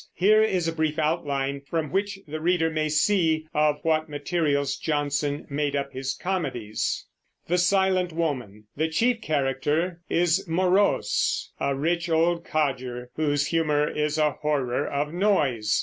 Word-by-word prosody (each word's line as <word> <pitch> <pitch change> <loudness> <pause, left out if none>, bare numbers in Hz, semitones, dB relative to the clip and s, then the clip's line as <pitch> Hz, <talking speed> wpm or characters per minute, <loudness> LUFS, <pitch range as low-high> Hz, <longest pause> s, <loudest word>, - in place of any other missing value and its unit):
Here 215 +4 +5
is 185 -6 +1
a 165 - -1
brief 155 -1 -1
outline 140 -3 -1
from 155 +1 -3
which 200 +1 -1
the 155 +1 -5
reader 165 -1 +2
may 155 -1 -1
see 160 0 +2
of 150 -1 +2
what 160 -1 +1
materials 145 -2 0
Jonson 145 -1 -1
made 145 0 -1
up 140 -1 -2
his 130 +1 -3
comedies. 130 - -2 0.4
The 175 - 0 0.3
chief 230 +7 +1
character 150 +4 -1
is 175 +3 +2
Morose, 185 +4 +1
a 140 - 0
rich 170 +4 -1
old 170 +1 +2
codger 130 -6 -2
whose 145 -2 +1
humor 150 -2 +1
is 150 0 -1
a 150 -1 +3
horror 140 -2 -1
of 145 +2 -2
noise. 140 - +1
155 Hz, 135 wpm, -25 LUFS, 140-175 Hz, 0.4 s, Here